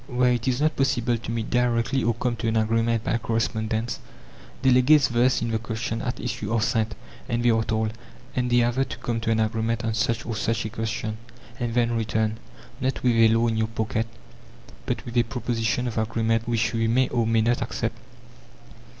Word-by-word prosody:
Where 125 0 +2
it 120 +1 -2
is 125 0 +1
not 155 +1 +2
possible 120 -3 +1
to 115 0 -5
meet 115 -1 -3
directly 125 +1 +1
or 115 0 +1
come 120 +1 -1
to 115 - -2
an 110 - +1
agreement 115 +1 +1
by 115 - 0
correspondence, 110 0 -1 0.6
delegates 130 +1 +5
versed 120 +1 +2
in 115 - -1
the 110 - 0
question 115 0 -3
at 125 - -3
issue 125 - -4
are 115 - +2
sent, 110 -1 0 0.3
and 120 0 0
they 120 - +6
are 110 0 +2
told: 110 -1 -1 0.4
"Endeavour 120 0 +2
to - - -6
come 115 -1 -2
to 115 - -2
an 115 0 +2
agreement 110 +1 0
on 115 - 0
such 110 +1 0
or 115 - -3
such 115 +1 -1
a - - -2
question, 110 -1 -3 0.4
and 120 -2 -2
then 120 -1 +2
return, 110 -1 0 0.4
not 130 0 -1
with 125 -2 +3
a 115 0 +6
law 115 +1 +3
in 115 -1 0
your 110 0 +1
pocket, 110 0 -2 0.8
but - - -2
with 120 - -7
a - - +7
proposition 115 0 -1
of 115 -2 -2
agreement 115 0 0
which 115 -1 +1
we 115 -1 +1
may 125 +3 +3
or 120 -2 0
may 115 0 +3
not 120 +2 +1
accept." 115 0 -3
115 Hz, 200 wpm, -25 LUFS, 110-120 Hz, 0.8 s, a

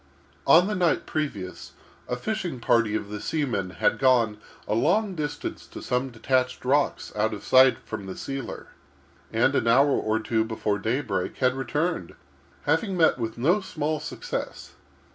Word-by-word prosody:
On 175 +2 +7
the 210 - -1
night 180 -4 +1
previous, 105 -12 -4 0.4
a 125 - 0
fishing 180 - -3
party 115 -2 +2
of 105 -2 -3
the 105 0 -5
seamen 125 - -1
had 105 +3 0
gone 120 -5 +3 0.3
a - - 0
long 190 - +2
distance 150 -3 -5
to - - -9
some 125 +2 -1
detached 130 +1 -1
rocks 140 +3 +1
out 105 +1 0
of 100 - -10
sight 130 0 +6
from 105 -3 -6
the 95 - -7
sealer, 135 -3 -6 0.6
and, - - +2
an 115 - +1
hour 135 +5 +5
or 110 -4 +1
two 110 0 0
before 110 -2 -2
daybreak, 110 -4 -2
had 130 -1 +2
returned, 145 - -2 0.5
having 170 +6 0
met 160 -5 +4
with 115 -1 -3
no 170 - +2
small 155 -4 -2
success. - - -5
130 Hz, 160 wpm, -26 LUFS, 110-150 Hz, 0.6 s, On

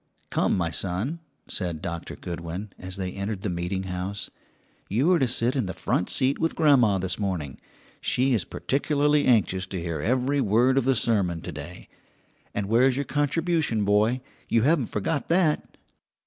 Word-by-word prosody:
"Come, - - +2
my 85 -3 0
son," 100 - -2 0.3
said 85 -5 -2
Doctor 85 -2 -5
Goodwin, 85 +4 -6
as 90 0 -6
they 95 -2 -3
entered 100 0 -4
the 100 - -1
meeting 90 +2 -2
house, 95 +2 -4 0.6
"you 130 - +2
are 175 - +4
to 130 - +3
sit 120 +2 0
in 125 -8 0
the 90 - -5
front 90 - 0
seat 135 0 +2
with 165 0 0
grandma 130 -10 +4
this 90 0 -2
morning: 90 -10 -3 0.4
she 130 +1 +2
is 110 -7 +2
particularly 145 - +1
anxious 95 -6 +2
to 95 -1 -4
hear 85 -1 -3
every 130 +4 +1
word 125 +5 +3
of 130 - -2
the 135 0 +3
sermon 100 -7 +1
to 90 - -5
day. 75 +4 -9 0.6
And 105 - -2
where's 125 +5 +4
your 140 +1 -1
contribution, 145 - 0
boy? 105 +5 +3 0.3
You 115 -1 +3
haven't 145 -4 +3
forgotten 140 +9 -1
that?" 170 -3 +1
110 Hz, 170 wpm, -26 LUFS, 90-135 Hz, 0.6 s, are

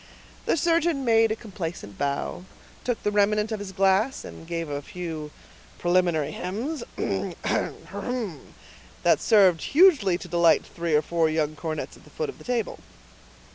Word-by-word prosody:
The - - +3
surgeon 330 -3 +2
made 225 -1 +4
a - - +1
complacent 175 - -6
bow, 140 +5 -2 0.4
took 245 -2 -2
the 210 - +1
remnant 210 +1 +2
of 215 - -2
his 200 -1 -6
glass, 195 +6 +2
and 165 - -10
gave 165 -1 -3
a 145 -1 -3
few 160 -2 -6 0.5
preliminary 175 -4 +2
hems, 230 - -4 0.2
that - - -1 1.5
served 190 -6 +5
hugely 280 - +5
to 180 - -9
delight 170 -1 +4
three 170 -2 -1
or 150 - +3
four 165 0 +1
young 155 -1 0
cornets 155 +1 -5
at - - -19
the - - -17
foot 470 -2 -3
of - - -9
the - - -12
table. 240 -5 -2
185 Hz, 150 wpm, -26 LUFS, 165-225 Hz, 1.5 s, served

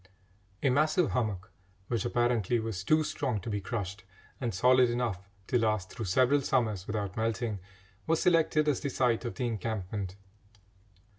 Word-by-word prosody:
A 140 - +4
massive 155 +5 +2
hummock, 105 -7 -2 0.4
which 115 -3 -1
apparently 120 -2 +1
was 110 -5 -4
too 155 +9 +3
strong 125 -6 -2
to 110 - -5
be 105 -1 -2
crushed, 100 -2 -4 0.4
and 120 -3 -1
solid 125 +5 +4
enough 115 -6 -2 0.2
to 125 - +1
last 110 -4 0
through 115 - -5
several 130 +9 +3
summers 110 -8 0
without 100 -3 -3
melting, 110 -1 -1 0.5
was 165 0 +2
selected 160 -3 +3
as 145 -4 +2
the 140 - -2
site 125 -3 +1
of 120 - -4
the 130 - -2
encampment. 105 -4 -3
115 Hz, 155 wpm, -30 LUFS, 100-130 Hz, 0.5 s, A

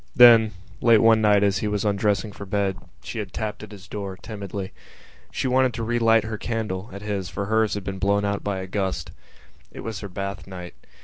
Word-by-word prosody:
Then 115 -3 +8 0.3
late 115 -2 +6
one 115 -1 +6
night 105 -1 +4
as 100 -2 +2
he 105 - -1
was 105 0 -1
undressing 105 +1 +1
for 100 0 -9
bed 100 -1 0 0.3
she - - -5
had 100 -3 -5
tapped 110 0 -4
at 105 -1 -10
his 100 0 -12
door, 100 -2 -5
timidly. 100 -3 -6 0.6
She - - -1
wanted 130 -1 +2
to 115 - -3
relight 115 -1 +3
her 110 -1 -5
candle 110 -4 -3
at 100 +2 -8
his 100 -3 -3
for 100 - -3
hers 110 0 +2
had 100 - -4
been 95 0 -5
blown 100 +1 +2
out 100 0 -1
by 100 -2 -2
a - - -5
gust. 95 -4 -2 0.6
It - - -8
was 110 -3 -5
her 100 - -7
bath 100 +2 -5
night. 90 -2 -8
105 Hz, 210 wpm, -24 LUFS, 100-110 Hz, 0.6 s, Then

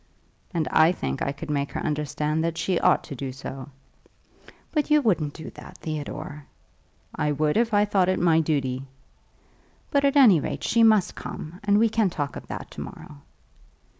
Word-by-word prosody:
"And 165 -5 -1
I 160 +2 +5
think 70 - -4
I 140 - 0
could 150 +2 -6
make 140 -1 -1
her - - -2
understand 150 +1 -1
that 165 0 -2
she 180 -1 0
ought - - +3
to 140 - -8
do 135 +1 -5
so." 130 +1 -8 1.0
"But 305 -2 0
you 300 0 +6
wouldn't 175 - 0
do 160 - -8
that, - - -12
Theodore?" 150 -1 -6 0.7
"I 150 -1 0
would 150 +1 +1
if 230 0 +2
I 205 -1 +4
thought 195 -3 +2
it 185 - +1
my 165 -2 +4
duty." 135 -4 -1 1.0
"But 280 -1 +2
at 280 0 +3
any 235 - +7
rate, - - -4
she 230 - +2
must 215 -5 +5
come, 170 +4 -8
and 205 0 +3
we 225 +2 +5
can 220 -2 +1
talk 145 -4 -4
of - - -9
that - - -7
to - - -7
morrow." 75 - -10
160 Hz, 185 wpm, -25 LUFS, 145-205 Hz, 1.0 s, any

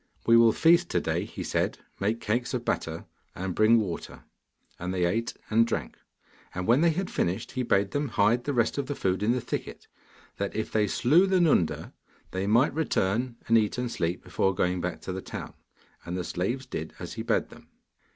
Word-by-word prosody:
'We 115 0 +6
will 115 -1 +7
feast 170 +6 +4
to - - +1
day,' - - -1
he - - -7
said; - - -1 0.2
'make 110 +4 0
cakes 120 +4 -1
of 120 -1 -4
batter, 80 0 -2 0.3
and 95 0 -3
bring 110 +4 +5
water,' 95 -6 -5 0.6
and 90 +1 -3
they 90 -1 +1
ate 115 +7 -1 0.2
and 115 +1 +4
drank. 70 - -3 0.6
And 90 0 -2
when 120 +7 +4
they 170 - +5
had 185 +4 -2
finished 90 +2 -1
he 130 - -2
bade 100 -5 +1
them 145 0 -1
hide 115 +2 +2
the 145 - -1
rest 115 +3 +1
of 140 - -2
the 145 - -3
food 95 -4 0
in 105 +3 +2
the 125 - +1
thicket, - - -5 0.5
that 100 0 -3
if 110 - -2
they 105 -1 +2
slew 150 - +4
the 190 -1 +3
Nunda 145 - +2 0.4
they 95 +1 -2
might 120 +7 +4
return 125 -5 0
and 115 0 +6
eat 105 +1 -1
and 125 -1 -2
sleep 85 -2 -2
before 95 -1 0
going 90 0 0
back 90 0 -4
to - - -5
the 95 - -4
town. - - -7 0.5
And 90 +1 -4
the 90 - -2
slaves 120 +11 -2
did 80 -11 -6
as - - -7
he - - -5
bade - - 0
them. - - -15
110 Hz, 210 wpm, -27 LUFS, 95-125 Hz, 0.6 s, will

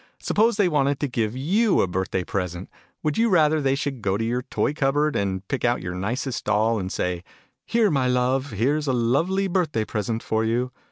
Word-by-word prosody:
Suppose 225 +1 +2
they 205 -3 +4
wanted 145 -4 +1
to 145 - +1
give 115 -2 -2
you 195 - +2
a - - +1
birth 95 +1 -2
day 95 - -1
present, 90 -2 -4 0.3
would 155 +6 0
you 230 0 +3
rather 155 -4 +3
they 135 -1 +2
should 140 -3 -3
go 100 -1 0
to 115 - -2
your 120 +2 -1
toy 135 - -1
cupboard, 145 +1 +1
and 95 -1 -2
pick 135 - -3
out 120 -7 +1
your 90 -1 -4
nicest 115 +7 -3
doll, 110 +1 +2
and 95 -1 -4
say 90 -1 -2 0.2
" - - -44
Here, 225 -4 +2
my 135 -3 +1
love, 125 +2 +1
here's 140 +8 0
a 130 - +2
lovely 160 +12 +1
birthday 170 - 0
present 110 +1 -3
for 110 0 0
you!" 120 +3 0
125 Hz, 215 wpm, -24 LUFS, 110-150 Hz, 0.3 s, they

